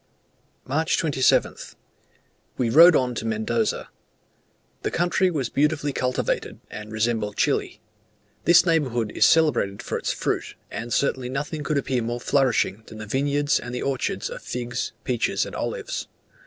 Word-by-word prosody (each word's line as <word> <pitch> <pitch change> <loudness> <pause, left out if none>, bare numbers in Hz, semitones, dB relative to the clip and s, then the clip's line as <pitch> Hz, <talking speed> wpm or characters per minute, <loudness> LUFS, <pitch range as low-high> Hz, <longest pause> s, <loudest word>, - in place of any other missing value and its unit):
March 155 +5 0
27th. 140 -5 +1 0.8
We 120 -3 0
rode 165 +5 +8
on 125 -1 +1
to 115 - -4
Mendoza. 110 0 -1 0.9
The - - -1
country 175 +2 +1
was 140 -8 -2
beautifully 145 0 0
cultivated, 125 -1 -2
and 105 0 -8
resembled 110 -1 -1
Chile. - - 0 0.7
This 170 +1 +6
neighbourhood 130 -10 +1
is - - +4
celebrated 140 -11 +2
for - - -3
its - - -1
fruit; - - -2 0.2
and 120 +1 -5
certainly 130 -2 0
nothing 150 +3 -4
could 150 +1 0
appear 130 -3 0
more 120 +1 -3
flourishing 125 -5 +1
than 110 - -10
the 110 - -7
vineyards 145 +5 +1
and 120 +1 -6
the - - -3
orchards 135 -2 -2
of - - -7
figs, 120 0 -4
peaches, 125 -3 0
and - - -8
olives. - - -4
130 Hz, 145 wpm, -24 LUFS, 115-150 Hz, 0.9 s, rode